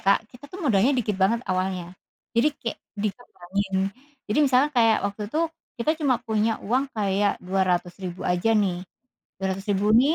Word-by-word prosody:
Kak, 195 +1 +5
kita 245 +5 -16
tuh 370 - -8
modalnya 230 -1 +4
dikit 215 -4 0
banget 190 +5 +2
awalnya, 185 -1 -2 0.4
jadi 235 +6 +4
kayak 230 - -4 0.2
dikembangin. 200 -3 -3 0.5
Jadi 210 - 0
misalnya 270 0 +4
kayak 225 -3 +5
waktu 200 +1 -5
itu, 310 - 0 0.4
kita 235 +6 +1
cuma 255 -5 +3
punya 220 -2 0
uang 260 +5 +1
kayak 205 -2 +1
200.000 180 -1 -1
aja 180 +5 +2
nih, 180 -3 0 0.6
200.000 195 +2 0
nih, 275 +7 +5
205 Hz, 150 wpm, -25 LUFS, 190-235 Hz, 0.6 s, Kak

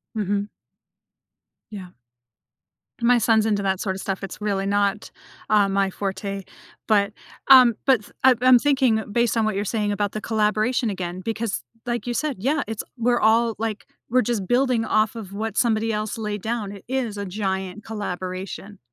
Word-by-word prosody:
Mhm. 205 -1 -1 1.2
Yeah. 185 -4 -8 1.1
My 240 +1 +4
son's 220 -1 +3
into 205 -2 0
that 190 -1 0
sorta 190 -1 -2
stuff, 195 0 -4
it's 195 - -7
really 200 -2 -1
not, 200 +1 0 0.4
um, 200 -2 +3
my 195 -1 +2
forte. 195 0 -4 0.4
But, 205 -2 +2 0.4
um, 255 -3 +8
but 260 -5 +4
th - - -16
I'm 260 -3 +6
I'm 255 -1 +7
thinking, 260 -6 +2
based 235 +1 +1
on 220 - +2
what 215 -3 -1
you're 205 - -1
saying 210 0 -1
about 205 0 -1
the 215 - -5
collaboration 220 +2 +1
again 180 -2 -4
because, 225 0 -3 0.2
like 240 0 -2
you 240 - -1
said, 290 -1 -2
yeah, 275 +9 +1
it's 220 -2 -4
we're 240 +1 +2
all, 225 +1 +3
like, 220 -1 -3 0.2
we're 255 +1 +4
just 210 -5 -2
building 245 -2 +2
off 215 +2 +1
of 200 -4 -8
what 220 +1 -4
somebody 225 -1 +2
else 215 +2 -3
laid 210 -2 -4
down. 220 -2 -3
It 200 - -11
is 245 -5 -2
a 200 - -3
giant 190 0 -3
collaboration. 195 -1 -6
215 Hz, 170 wpm, -23 LUFS, 200-235 Hz, 1.2 s, um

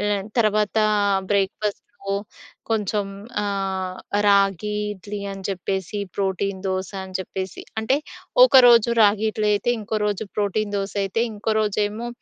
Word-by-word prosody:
లె 205 - 0 0.3
తర్వాతా 215 0 +2 0.5
బ్రేక్‌ఫా‌‌స్టూ 200 +1 0 0.9
కొంచెం 210 -2 0 0.4
ఆహ్, 190 -2 -2 0.3
రాగి 200 +1 +3 0.2
ఇడ్లీ 205 +1 -7
అని 195 -1 -9
చెప్పేసి, 190 +1 -3 0.2
ప్రోటీన్ 195 0 -1
దోస 190 0 -2
అని 185 -1 -4
చెప్పేసి, 190 0 -6 0.2
అంటే, 240 +5 +2 0.5
ఒకరోజు 240 - +7
రాగి 210 +1 +4
ఇడ్లీ 215 0 -1
అయితే 205 +4 0
ఇంకో 215 +1 -3
రోజు 205 +1 -2
ప్రోటీన్ 205 0 -1
దోసయితే, 200 +2 -1
ఇంకో 215 +1 -1
రోజేమో 210 +2 -1
205 Hz, 120 wpm, -23 LUFS, 195-215 Hz, 0.9 s, ఒకరోజు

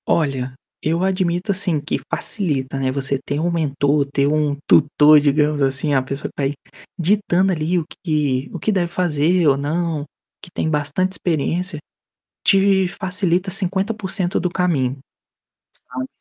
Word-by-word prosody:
Olha, 135 -5 0 0.3
eu 165 +3 0
admito, 185 0 0
assim, 185 -5 +1
que 145 - -3
facilita, 140 -9 -2
né, 130 -1 0
você 135 0 0
ter 145 - -3
um 175 +2 0
mentor, 145 -3 +1
ter 140 0 +2
um 150 -1 +1
tutor, 150 +1 +6
digamos 150 +1 +1
assim. 140 +2 0
A 135 - +3
pessoa 135 +2 -5
tá, 140 - -3
aí, 135 +1 0 0.4
ditando, 190 +1 +2
ali, 170 +1 0
o 165 - -1 0.2
que 145 -6 0
o - - -6
que 220 - 0
deve 185 -4 +1
fazer 170 0 +1
ou 135 -1 +4
não, 155 +1 -2 0.4
que - - -11
tem - - -2
bastante 155 +5 0
experiência, 175 0 -2 0.6
te 195 -1 +4
facilita 185 -1 -1
50% 190 0 -1
do 180 - -1
caminho, 155 -8 0 0.9
sabe. 130 +1 -4
160 Hz, 150 wpm, -20 LUFS, 145-185 Hz, 0.9 s, tutor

